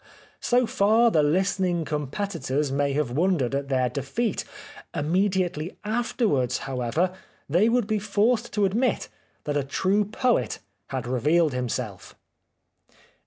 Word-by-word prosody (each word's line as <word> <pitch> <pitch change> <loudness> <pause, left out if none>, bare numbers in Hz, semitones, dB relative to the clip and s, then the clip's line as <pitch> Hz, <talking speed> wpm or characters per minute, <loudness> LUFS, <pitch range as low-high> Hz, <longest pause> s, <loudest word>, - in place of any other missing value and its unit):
So 245 +1 +2
far 225 +3 +3
the 155 - +4
listening 180 +2 +1
competitors 150 -2 -2
may 140 0 +1
have 145 -3 0
wondered 150 -3 +1
at 140 0 -1
their 130 -2 +2
defeat. 140 - -2 0.5
Immediately 180 0 0
after 235 +2 0
wards, 125 - +1
however, 135 +7 -1 0.3
they 180 +10 +3
would 240 -1 +2
be 215 0 0
forced 215 +4 +1
to 210 -1 +2
admit 225 +6 0 0.3
that 145 - -2
a 145 - +1
true 190 +9 +1
poet 215 - 0 0.3
had - - -4
revealed 150 +5 +2
himself. 125 -2 -4
175 Hz, 125 wpm, -25 LUFS, 140-210 Hz, 0.5 s, the